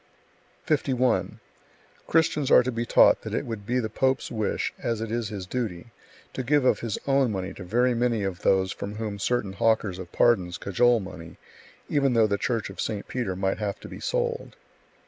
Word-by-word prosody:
51. 130 -5 0 0.7
Christians 155 -3 +2
are - - +7
to 130 - -2
be 115 0 -3
taught - - +5
that - - -5
it - - -2
would 110 -3 -6
be 125 - +1
the 120 -3 0
pope's 130 +4 0
wish, 110 -3 -1
as 115 -2 -2
it 110 -1 -4
is 115 -2 -2
his 100 -3 -6
duty, 110 -2 -4 0.4
to - - -3
give 140 +2 +2
of - - +3
his 115 -3 -3
own 135 -3 +2
money 95 -1 -4
to 95 - -9
very 120 +7 +2
many 120 -3 0
of 95 -2 -3
those 95 -1 +2
from 100 +1 -6
whom 105 -2 -4
certain 105 -2 -1
hawkers 100 -3 +1
of 90 -3 -8
pardons 95 -7 +2
cajole 120 +4 +2
money, 85 -3 -10 0.5
even 140 -3 +2
though 115 -2 +5
the 100 -1 0
church 115 -3 -1
of 95 - -6
St. 105 -2 -3
Peter 120 -7 -3
might 95 +2 -1
have 105 -2 -3
to - - -9
be - - -9
sold. 485 -1 -2
115 Hz, 195 wpm, -26 LUFS, 100-125 Hz, 0.7 s, are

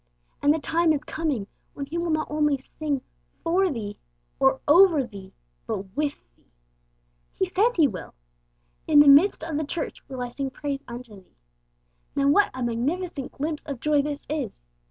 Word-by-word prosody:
And 290 - +5
the 310 - +3
time 325 +2 +2
is 295 -1 -2
coming 295 -10 -2 0.3
when 280 - -4
He 325 +5 -4
will 340 0 -1
not 310 -1 +1
only 295 -2 +2
sing 280 +1 -4 0.4
'for 360 +3 +2
thee' 215 -8 -5 0.4
or 265 0 +4
'over 330 -1 +6
thee,' 200 -5 -10 0.4
but 190 +1 -5
with 295 0 0 0.2
thee. - - -35 0.8
He 380 - +1
says 410 +6 +2
He 315 -4 +5
will! 185 - -8 0.7
'In 305 - +4
the 290 - +8
midst 295 +6 +6
of 320 -2 -3
the - - -1
church 315 +3 -4
will 260 -2 -4
I 245 - -4
sing 270 +2 -3
praise 280 +1 -4
unto 235 -3 -9
Thee.' - - -35 0.8
Now 280 0 +3
what 405 +8 +5
a 255 - -5
magnificent 275 +6 -2
glimpse 300 +1 -3
of 280 -5 -5
joy 300 +1 +3
this 290 0 -5
is! 285 - -4
290 Hz, 175 wpm, -25 LUFS, 260-320 Hz, 0.8 s, the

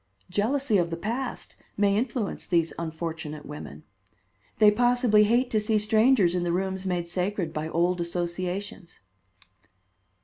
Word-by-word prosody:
Jealousy 220 +3 +1
of 170 -1 0
the 165 - -4
past 235 +8 -4 0.2
may 200 -1 +3
influence 230 -1 -2
these 165 -2 +1
unfortunate 160 -2 -5
women. 150 +1 -9 0.7
They 210 -1 +7
possibly 240 -2 +4
hate 240 +4 +2
to 215 - +2
see 215 +1 +1
strangers 215 -2 +3
in 180 - 0
the 175 -1 -1
rooms 190 +1 -2
made 175 -2 -1
sacred 180 -1 -2
by 155 +1 -3
old 175 +2 +1
associations." 180 +2 -4
190 Hz, 135 wpm, -26 LUFS, 170-215 Hz, 0.7 s, They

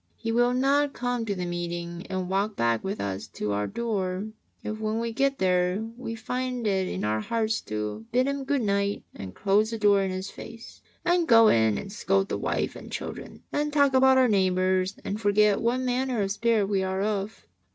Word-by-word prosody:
He 225 0 -3
will 240 +2 +3
not 275 +2 +2
come 245 -2 -2
to 200 - -1
the 180 -1 -3
meeting 175 0 -4
and 185 -1 -2
walk 200 +3 0
back 115 -1 +1
with 195 +2 -3
us 100 0 -3
to 105 - -3
our 105 0 -1
door, 205 -3 -2 0.3
if 215 0 -4
when 220 +1 -1
we 230 0 -3
get 275 +3 +1
there 180 +3 +1
we 235 -2 -5
find 250 +1 -3
it 190 -3 +1
in 90 - -4
our 105 +1 0
hearts 220 - -1
to 105 0 -4
bid 255 +1 +3
Him 280 0 -2
good 275 -2 0
night 200 0 0
and 95 -1 -8
close 205 +2 +2
the 230 - -3
door 205 -2 +4
in 195 - -1
His 185 +1 -4
face, 230 0 -11 0.2
and 345 -1 +2
go 225 -2 +7
in 110 -2 +3
and 195 - -6
scold 195 -1 +1
the - - -2
wife - - -1
and - - -10
children - - -7
and 295 0 0
talk 285 -2 +3
about 265 0 +5
our 260 -1 +5
neighbours 185 -1 +2
and 205 +2 -3
forget 205 0 +3
what 240 +3 +1
manner 250 -3 0
of 195 - -2
spirit 225 0 +2
we 195 -1 0
are 190 +1 -1
of. 205 0 -3
205 Hz, 205 wpm, -26 LUFS, 185-235 Hz, 0.3 s, go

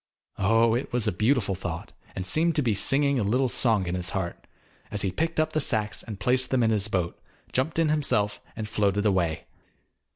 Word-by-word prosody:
Oh, 115 +3 +3
it 120 +3 -2
was 120 -2 +1
a - - +2
beautiful 105 +2 +1
thought, 90 -3 -6 0.2
and 95 - -4
seemed 160 - +2
to 150 - +2
be 115 -3 +2
singing 140 +6 +2
a - - +1
little 125 +6 +2
song 110 -6 +2
in 85 - -3
his 90 -2 -2
heart, 95 -3 -4 0.4
as 105 - 0
he 95 - 0
picked 165 - -1
up 155 0 +1
the 155 - +1
sacks 105 -7 +1
and 105 -4 -8
placed 125 +4 +1
them 130 -2 +2
in 110 - +3
his 105 -1 +1
boat, 90 -5 -2 0.3
jumped 135 +6 0
in 165 -2 +3
himself 120 -9 +1
and 110 -1 -4
floated 105 -2 0
away. 90 -6 +1
110 Hz, 205 wpm, -26 LUFS, 95-130 Hz, 0.4 s, Oh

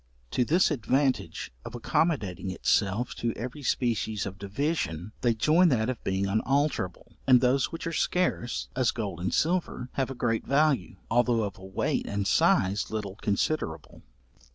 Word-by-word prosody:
To 125 - +2
this 170 +7 +3
advantage 135 - 0
of - - -8
accommodating 105 - 0
itself 100 +5 +1
to 115 -1 -1
every 125 +6 -6
species 115 -5 0
of 95 0 -7
division, 100 - -2
they 120 -2 +2
join 160 +10 +4
that 120 -4 +1
of 125 - -8
being 95 +1 0
unalterable, 110 - -1
and 130 -2 +7
those 130 +2 +2
which 165 - -6
are 165 - -3
scarce, 170 -9 0
as 125 -2 +2
gold 100 -7 -3
and 90 +1 -1
silver, 165 -7 0
have 135 -2 -1
a 135 - -5
great 115 -2 0
value, 140 - +2 0.2
although 120 -1 +3
of 100 -2 -5
a - - -13
weight 95 0 -1
and 100 -1 -2
size 95 +1 +3
little 105 -3 -4
considerable. 100 - -2
120 Hz, 155 wpm, -28 LUFS, 100-140 Hz, 0.2 s, and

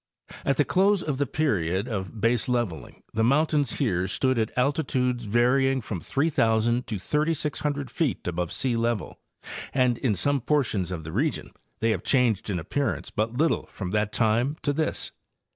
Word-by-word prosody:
At 140 - +1
the 145 - +3
close 195 +1 +3
of 145 -3 -2
the 145 - +1
period 100 - 0
of 95 -6 -4
baseleveling 115 -5 -1
the 110 - +1
mountains 145 +1 +2
here 95 -9 0
stood 130 +5 +1
at 110 0 0
altitudes 125 -3 0
varying 130 +5 +3
from 110 -6 -5
3,000 120 - +1
to 105 -1 -3
3,600 150 - -1
feet 155 - -1
above 90 0 -1
sealevel, 115 -4 -1 0.6
and 125 -3 +2
in 115 -6 +1
some 140 +8 +1
portions 115 - 0
of 85 -3 -4
the 80 - -7
region 140 - -1 0.3
they 115 0 +3
have 95 -5 -1
changed 120 -7 +2
in 95 - 0
appearance 130 - -2
but 110 +2 -1
little 160 +3 +1
from 90 -3 -6
that 105 0 0
time 120 +7 +1
to 145 - +1
this. 155 +2 -1
120 Hz, 160 wpm, -26 LUFS, 105-145 Hz, 0.6 s, the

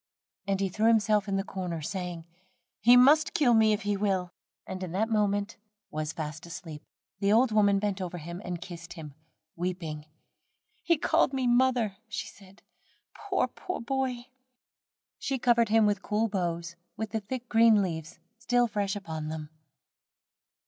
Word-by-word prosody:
And 195 -1 0
he 195 - +1
threw 215 +4 +1
himself 215 -2 +3
in 195 - -1
the 195 - 0
corner, 180 -4 -4
saying: 175 0 -5 0.5
"he 240 +3 +7
must 295 +5 +5
kill 250 -5 +4
me 220 -1 +5
if 210 -1 0
he 205 0 0
will," 190 -3 0 0.3
and 185 0 -6
in 180 -1 -5
a 215 +3 +2
moment 210 -1 0 0.3
was 155 -1 -3
fast 155 +1 -6
asleep. 165 -3 -8 0.4
The 200 0 +2
old 230 +2 +4
woman 205 -2 +4
bent 200 -1 -1
over 180 -1 -4
and 175 +2 -6
kissed 170 -1 -9
him, 150 -3 -9 0.4
weeping. 165 -4 -4 0.7
"He 335 -2 +2
called 285 - +2
me 260 -1 0
mother," 240 -4 +2
she 235 +2 -4
said, 195 0 -16 0.5
"poor 400 -2 -1
boy, - - -13
poor 365 - -5
boy." 255 0 -2 0.9
She 270 - -1
covered 235 -2 +3
him 225 +1 +5
over - - +4
with 205 -1 -1
cool 215 +3 0
boughs, 170 -3 -2 0.2
with 220 -1 -4
the 220 - -1
thick 245 +4 -6
green 225 -3 +5
leaves 160 -4 -5 0.2
still 245 +1 +2
fresh 205 -3 -2
upon 160 -6 -5
them. 155 -1 -6
200 Hz, 165 wpm, -28 LUFS, 175-230 Hz, 0.9 s, he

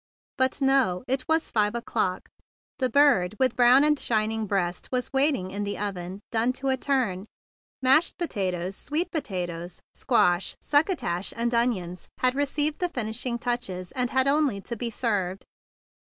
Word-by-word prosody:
But 260 +1 0
now 265 -9 +2
it 255 0 -1
was 320 0 +1
five 210 0 +1
o'clock. 185 -5 -2 0.5
The 255 -1 +1
bird 235 -8 +4
with 260 -2 +1
brown 250 +3 +6
and 300 -1 +3
shining 220 -1 0
breast 180 -3 -2
was 250 +1 -1
waiting 270 -9 +2
in 205 +1 -3
the 205 0 -3
oven, 190 -1 -5
"done 235 +2 +1
to 270 +1 -3
a 265 - +3
turn;" 240 -9 -1 0.6
mashed 270 +6 +4
potatoes, 190 - -2
sweet 310 - -2
potatoes, 180 - -4
squash, 175 +1 +2
succotash, 285 - 0
and 235 +1 -1
onions 195 -7 -1
had 255 0 +2
received 290 +2 0
the 355 - 0
finishing 235 -1 -2
touches, 230 -7 -3
and 250 -1 -1
had 260 +1 +2
only 280 -7 +2
to 235 - -5
be 235 +1 -3
"taken 210 -5 0
up." 195 - -17
235 Hz, 155 wpm, -26 LUFS, 190-270 Hz, 0.6 s, brown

